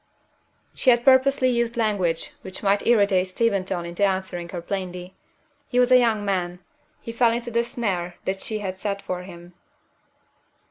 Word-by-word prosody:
She 260 Hz, -, +1 dB
had 240 Hz, -1 st, +4 dB
purposely 265 Hz, 0 st, +4 dB
used 235 Hz, -1 st, 0 dB
language 195 Hz, -7 st, 0 dB
which 190 Hz, +2 st, -8 dB
might 200 Hz, 0 st, +1 dB
irritate 200 Hz, -5 st, +3 dB
Steventon 190 Hz, -3 st, -1 dB
into 170 Hz, +3 st, -3 dB
answering 185 Hz, -3 st, -1 dB
her 175 Hz, -, -5 dB
plainly. 180 Hz, 0 st, -5 dB, 0.5 s
He 250 Hz, -, -3 dB
was 250 Hz, 0 st, +3 dB
a 255 Hz, -, +8 dB
young 220 Hz, -4 st, +1 dB
man 180 Hz, -3 st, -1 dB, 0.4 s
he 230 Hz, -, -6 dB
fell 230 Hz, 0 st, +3 dB
into 240 Hz, +1 st, -3 dB
the 235 Hz, +1 st, +1 dB
snare 190 Hz, -7 st, -3 dB
that 190 Hz, 0 st, -2 dB
she 215 Hz, -, -2 dB
had 190 Hz, -3 st, -5 dB
set 200 Hz, -1 st, -2 dB
for 180 Hz, -1 st, -4 dB
him. 175 Hz, -1 st, -12 dB
200 Hz, 165 wpm, -24 LUFS, 180-235 Hz, 0.5 s, a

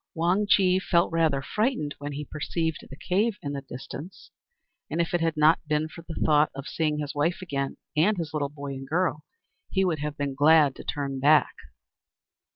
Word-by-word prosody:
Wang 180 Hz, +5 st, +1 dB
Chih 185 Hz, -2 st, +4 dB
felt 170 Hz, -2 st, +2 dB
rather 160 Hz, -5 st, +1 dB
frightened 210 Hz, -, -1 dB
when 145 Hz, 0 st, -5 dB
he 150 Hz, +1 st, -5 dB
perceived 160 Hz, +2 st, -2 dB
the 135 Hz, -, -9 dB
cave 205 Hz, +8 st, 0 dB
in 145 Hz, -1 st, -3 dB
the 140 Hz, -, -4 dB
distance, 140 Hz, +7 st, -9 dB, 0.6 s
and 165 Hz, -, -3 dB
if 170 Hz, 0 st, 0 dB
it 175 Hz, -, +1 dB
had 165 Hz, -1 st, 0 dB
not 155 Hz, +2 st, +5 dB
been 150 Hz, +1 st, +1 dB
for 165 Hz, +1 st, -11 dB
the 165 Hz, -1 st, -7 dB
thought 150 Hz, 0 st, +4 dB
of 140 Hz, 0 st, -6 dB
seeing 155 Hz, -2 st, -1 dB
his 150 Hz, -1 st, -4 dB
wife 155 Hz, +4 st, 0 dB
again, 140 Hz, -7 st, -3 dB, 0.2 s
and 190 Hz, +7 st, +3 dB
his 160 Hz, -3 st, -4 dB
little 145 Hz, -2 st, -1 dB
boy 140 Hz, -1 st, -7 dB
and 135 Hz, 0 st, -7 dB
girl, 155 Hz, -1 st, 0 dB, 0.5 s
he 190 Hz, -1 st, +1 dB
would 165 Hz, -4 st, 0 dB
have 150 Hz, 0 st, -4 dB
been 140 Hz, -1 st, -2 dB
glad 150 Hz, 0 st, +5 dB
to -, -, -9 dB
turn 140 Hz, -2 st, -3 dB
back. 145 Hz, 0 st, +4 dB
155 Hz, 195 wpm, -26 LUFS, 145-170 Hz, 0.6 s, not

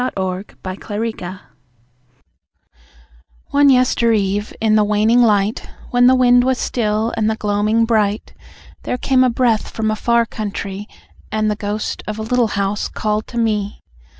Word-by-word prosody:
The 190 Hz, 0 st, -3 dB, 0.5 s
Little 225 Hz, +2 st, -1 dB
House 185 Hz, +1 st, -7 dB, 2.1 s
One 285 Hz, 0 st, +5 dB
yestereve, 225 Hz, -5 st, +2 dB
in 220 Hz, -1 st, +2 dB
the 215 Hz, -1 st, +4 dB
waning 215 Hz, +3 st, +3 dB
light, 210 Hz, -2 st, +1 dB, 0.2 s
When 245 Hz, 0 st, +4 dB
the 260 Hz, -, +6 dB
wind 245 Hz, -1 st, +5 dB
was 260 Hz, 0 st, +1 dB
still 220 Hz, -1 st, -1 dB
and 220 Hz, -1 st, +1 dB
the 220 Hz, -, 0 dB
gloaming 210 Hz, +2 st, +1 dB
bright, 215 Hz, -2 st, 0 dB, 0.5 s
There 250 Hz, -, -3 dB
came 255 Hz, 0 st, +2 dB
a 255 Hz, -, +3 dB
breath 235 Hz, -2 st, +1 dB
from 220 Hz, -1 st, -2 dB
a -, -, -1 dB
far 235 Hz, +2 st, +2 dB
countrie, 205 Hz, -2 st, -5 dB, 0.4 s
And 215 Hz, 0 st, 0 dB
the -, -, -1 dB
ghost 210 Hz, 0 st, -4 dB
of 215 Hz, 0 st, -4 dB
a 220 Hz, -, -4 dB
Little 245 Hz, +1 st, +1 dB
House 200 Hz, +1 st, -1 dB
called 215 Hz, 0 st, -2 dB
to 240 Hz, -, -8 dB
me. 210 Hz, -3 st, -1 dB
215 Hz, 150 wpm, -18 LUFS, 210-235 Hz, 2.1 s, the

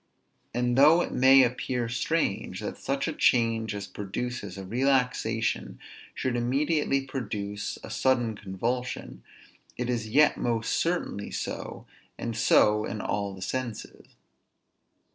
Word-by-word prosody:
And 125 Hz, +1 st, +1 dB
though 155 Hz, +5 st, +7 dB
it -, -, -5 dB
may 130 Hz, +1 st, +7 dB
appear 125 Hz, 0 st, -1 dB
strange 120 Hz, -1 st, -1 dB
that -, -, -5 dB
such 135 Hz, +2 st, -1 dB
a 160 Hz, -, -2 dB
change 115 Hz, -5 st, +2 dB
as 100 Hz, 0 st, -4 dB
produces 100 Hz, 0 st, -5 dB
a 95 Hz, -, -6 dB
relaxation 120 Hz, -, 0 dB, 0.4 s
should 130 Hz, -2 st, -1 dB
immediately 135 Hz, +3 st, +1 dB
produce 105 Hz, -6 st, -4 dB
a -, -, -8 dB
sudden 120 Hz, -4 st, +1 dB
convulsion; 115 Hz, +6 st, -4 dB, 0.6 s
it 125 Hz, 0 st, -1 dB
is 115 Hz, -3 st, -2 dB
yet 150 Hz, +6 st, +4 dB
most 115 Hz, -2 st, -1 dB
certainly 165 Hz, -, -1 dB
so, -, -, -5 dB, 0.3 s
and 115 Hz, -1 st, -4 dB
so 105 Hz, 0 st, +4 dB
in 110 Hz, -, -4 dB
all 100 Hz, -1 st, -2 dB
the 95 Hz, -, -7 dB
senses. 125 Hz, +1 st, -5 dB
120 Hz, 125 wpm, -27 LUFS, 105-130 Hz, 0.6 s, though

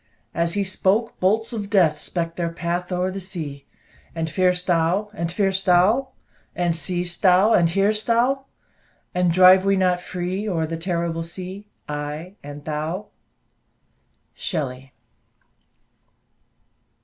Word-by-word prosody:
As 170 Hz, +1 st, 0 dB
he 200 Hz, -, +1 dB
spoke, 195 Hz, +4 st, 0 dB
bolts 220 Hz, +6 st, +1 dB
of 205 Hz, -3 st, -4 dB
death 175 Hz, -7 st, +3 dB
Speck'd 165 Hz, -1 st, -2 dB
their 170 Hz, -1 st, -1 dB
path 175 Hz, +2 st, -3 dB
o'er 180 Hz, +1 st, 0 dB
the 195 Hz, -, -5 dB
sea. 160 Hz, -7 st, -6 dB, 0.5 s
"And 160 Hz, -1 st, -2 dB
fear'st 180 Hz, -1 st, +2 dB
thou, 180 Hz, +4 st, +1 dB
and 170 Hz, -5 st, -3 dB
fear'st 195 Hz, 0 st, 0 dB
thou? 195 Hz, +9 st, +4 dB, 0.5 s
And 175 Hz, -2 st, 0 dB
see'st 175 Hz, 0 st, -2 dB
thou, 190 Hz, +3 st, +5 dB
and 170 Hz, -2 st, +4 dB
hear'st 200 Hz, +4 st, +1 dB
thou? 250 Hz, +4 st, +2 dB, 0.7 s
And 180 Hz, -1 st, +2 dB
drive 185 Hz, +2 st, +7 dB
we 195 Hz, 0 st, +2 dB
not 180 Hz, -1 st, +2 dB
free 185 Hz, +4 st, -3 dB
O'er 165 Hz, -4 st, 0 dB
the 165 Hz, +1 st, -4 dB
terrible 170 Hz, -1 st, -2 dB
sea, 185 Hz, +4 st, -6 dB, 0.2 s
I 150 Hz, +4 st, -5 dB
and 145 Hz, 0 st, -9 dB
thou?" 160 Hz, +6 st, -3 dB, 1.2 s
SHELLEY. 135 Hz, -6 st, -4 dB
180 Hz, 130 wpm, -23 LUFS, 165-195 Hz, 1.2 s, drive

